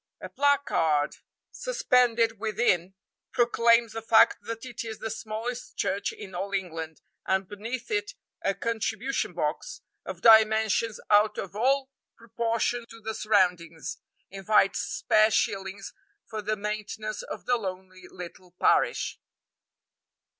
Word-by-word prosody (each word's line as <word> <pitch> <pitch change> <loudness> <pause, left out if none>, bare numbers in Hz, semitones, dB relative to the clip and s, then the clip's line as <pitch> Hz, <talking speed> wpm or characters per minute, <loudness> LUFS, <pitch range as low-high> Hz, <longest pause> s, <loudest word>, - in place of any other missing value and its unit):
A - - -8
placard 215 - +1 0.3
suspended 245 - +2
within 195 -4 0 0.4
proclaims 235 -2 +3
the 225 - -4
fact 225 0 +5
that 225 +3 -6
it 245 -3 -6
is 220 -2 -6
the 225 - -5
smallest 225 +2 -5
church 195 +2 -1
in 190 - -10
all 195 +3 -4
England, 165 -4 -4 0.3
and 190 0 +1
beneath 230 - -6
it 415 -1 -1 0.3
a 195 - 0
contribution 230 +4 -2
box, - - -3 0.2
of - - -7
dimensions 220 0 +5
out 210 +1 +4
of 195 - -6
all 265 +4 +1 0.3
proportion 230 +1 -2
to 230 - -12
the 220 0 -5
surroundings, 180 -7 0 0.3
invites 195 +1 +2
spare 215 0 +3
shillings 195 -2 -2 0.3
for 215 -1 -5
the 215 +1 -1
maintenance 215 +1 -4
of - - -8
the 245 - +3
lonely 185 -3 -7
little 180 0 -11
parish. - - +2
220 Hz, 125 wpm, -27 LUFS, 195-230 Hz, 0.4 s, fact